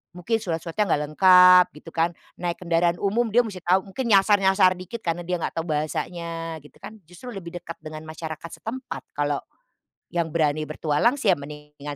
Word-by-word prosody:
mungkin 225 +6 -1
surat-suratnya 175 +1 -2
enggak 150 -4 +1
lengkap, 180 +1 +8
gitu 160 +2 -12
kan, 165 +1 +1 0.3
naik 175 -1 -2
kendaraan 170 0 +2
umum 225 +4 +1
dia 245 +3 +5
mesti 205 -5 -7
tahu, 185 +2 +2
mungkin 255 +5 -3
nyasar-nyasar 195 -1 +5
dikit 220 +5 -8
karena 170 0 -2
dia 180 - 0
enggak - - -3
tahu 165 - -4
bahasanya, 165 +2 -3
gitu 150 - -18
kan, 220 - -10
justru 180 +10 -11
lebih 175 -2 -8
dekat 170 -1 -8
dengan 155 0 -8
masyarakat 160 0 -7
setempat, 255 +4 -6
kalau 145 0 0 0.7
yang 170 -2 -1
berani 155 -1 +1
bertualang 155 - +1
sih 210 -7 +3
ya 180 - +2
mendingan 150 0 -9
175 Hz, 175 wpm, -24 LUFS, 155-195 Hz, 0.7 s, lengkap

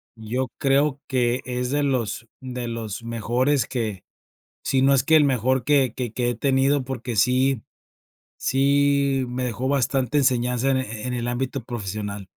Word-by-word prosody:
yo 120 +4 -3
creo 140 +1 +2
que 125 -1 +1
es 125 0 -2
de 145 +2 +1
los 120 -4 -1
de 125 -2 -5
los 115 -2 -5
mejores 120 +4 0
que, 110 -7 -3 0.6
si 135 -1 +1
no 135 +1 +5
es 130 - +3
que 160 +3 +4
el 155 - +6
mejor, 130 -1 +1
que 135 -4 +3
que 125 -3 -4
que 120 +1 -1
he 120 - -2
tenido, 135 +2 +2
porque 125 -2 -5
sí 130 +2 +2 0.8
sí 140 0 +2
me 125 +1 -3
dejó 125 +1 -3
bastante 135 0 +1
enseñanza 125 -1 +1
en 135 - +2
eh 130 - -2 0.2
e - - -5
en 125 - -2
el 120 -1 -2
ámbito 125 +1 -3
profesional. 105 -3 -5
130 Hz, 170 wpm, -23 LUFS, 120-135 Hz, 0.8 s, el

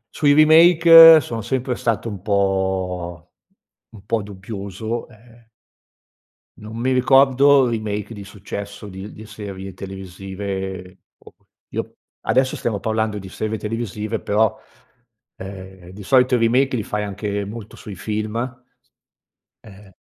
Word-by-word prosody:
sui 145 -1 +3
remake 165 +1 +8
sono 115 -3 -5
sempre 125 +2 -2
stato 115 -1 -2
un 100 -4 -8
po' 95 -3 -2 0.6
un 105 -3 -15
po' 110 +1 -1
dubbioso, 100 +3 -6
ehm 115 +1 -21 1.1
non 110 +1 -9
mi 130 +2 0
ricordo 135 +1 +5
remake 110 -1 -4
di 100 -2 -9
successo 100 +1 -8
di 95 0 -9
l - - -12
di 110 - -12
serie 95 -3 -8
televisive 95 0 -7 0.2
o - - -17
que - - -39 0.3
io - - -5 0.2
adesso 130 +1 +1
stiamo 110 -4 -3
parlando 110 -1 -1
di 95 - -10
serve 110 +3 -4
televisive 110 0 -4
però, 105 +1 +1 0.8
ehm, 95 -1 -10
di 100 +3 -11
solito 125 +3 +3
i - - +1
remake 125 +3 +2
li 110 - -3
fai 105 +1 -3
anche 100 0 -4
molto 105 +1 -9
sui 105 - -10
film, 110 +3 -4
s 125 +1 -8 0.9
ehm, 100 -1 -15
105 Hz, 135 wpm, -20 LUFS, 95-120 Hz, 1.1 s, remake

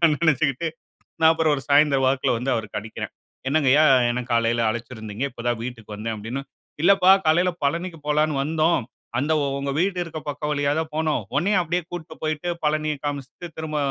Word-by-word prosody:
அப்டின்னு 165 -2 +5
நெனச்சுக்கிட்டு, 160 -1 +2 0.5
நான் 160 0 +7
அப்புறம் 160 -1 +2
ஒரு 135 - -5
சாயந்திரம் 140 -2 +4
வாக்குல 130 -2 +1
வந்து 130 +3 -1
அவருக்கு 105 -3 -3
அடிக்கிறேன். 110 +1 -7 0.4
"என்னங்கய்யா, 145 0 +4 0.3
என்ன 125 +1 -2
காலையில 115 0 +2
அழைச்சிருந்தீங்க, 110 -1 -6
இப்ப 120 -1 -9
தான் 120 -1 0
வீட்டுக்கு 110 -4 -7
வந்தேன்" 110 +1 -4
அப்டின்னு. 115 +6 -5 0.4
"இல்லப்பா 190 0 +6 0.2
காலையில 175 +3 +3
பழனிக்கு 170 +3 -2
போலான்னு 150 -1 +2
வந்தோம். 160 +2 +2 0.4
அந்த 145 +5 +1 0.3
ஒங்க 140 0 -2
வீடு 185 0 0
இருக்க 165 -2 -7
பக்கம் 150 +1 -4
வழியா 145 -1 +1
தான் 160 -1 -5
போனோம். 155 -6 0 0.2
ஒன்னய 190 +4 +2
அப்டியே 175 +2 -1
கூட்டு 175 -3 -7
போய்ட்டு, 155 +2 -2 0.2
பழனியை 155 0 0
காமிச்சுட்டு, 145 +3 -5
திரும்ப 155 -1 -3
150 Hz, 170 wpm, -23 LUFS, 125-160 Hz, 0.5 s, நான்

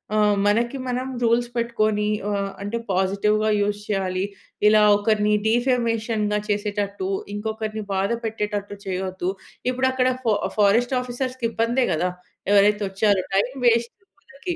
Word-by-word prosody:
ఆహ్, 210 -1 +4
మనకి 235 +6 +1
మనం 250 +1 -2
రూల్స్ 235 +1 +2
పెట్టుకోని, 215 -3 0 0.2
ఆహ్, 200 -1 -1
అంటే, 205 +4 -3
పాజిటివ్‌గా 200 +3 +1
యూజ్ 205 0 0
చేయాలి. 190 -2 -1 0.4
ఇలా 215 0 +6
ఒకరిని 210 0 +2
డీఫెమేషన్‌గా 230 -3 +1
చేసేటట్టు, 205 -2 -2 0.3
ఇంకొకరిని 215 +1 -4
బాధ 195 +1 0
పెట్టేటట్టు, 210 -2 -3
చేయొద్దు. 185 -1 -3 0.4
ఇపుడక్కడ 260 0 +1 0.2
ఫొ 225 - +3 0.2
ఫారెస్ట్ 220 +5 +3
ఆఫీసర్స్‌కిబ్బందే 245 -1 -1
కదా! 175 +3 0 0.4
ఎవరైతే 205 +1 +4
వచ్చారో, 195 -1 +2
టైం 200 +5 +2 0.2
వేస్ట్ 235 0 +2
ఇంకొకరికి. 280 +5 -8
215 Hz, 115 wpm, -23 LUFS, 205-235 Hz, 0.4 s, ఇలా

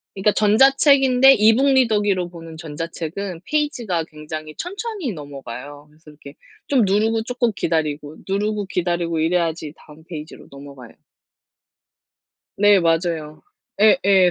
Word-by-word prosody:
그러니까 195 +2 +2
전자책인데 270 +3 +5
e-book 225 +6 +4
리더기로 205 -7 +1
보는 165 -2 -11
전자책은 165 +3 -6
페이지가 240 - -1
굉장히 155 0 -9
천천히 400 - -5
넘어가요. 145 -1 -9
그래서 155 +1 -19
이렇게 145 -2 -13 0.3
좀 255 -6 +3
누르고 220 +3 +1
쪼끔 245 0 -1
기다리고 155 -3 -2
누르고 205 +1 -1
기다리고 175 -3 -2
이래야지 165 -2 -1
다음 155 +1 -17
페이지로 155 -2 -10
넘어가요. 140 -3 -12 1.7
네 205 -1 +5
맞아요. 165 -2 -1 0.4
예예. 200 -4 +5
180 Hz, 340 characters per minute, -21 LUFS, 155-220 Hz, 1.7 s, 전자책인데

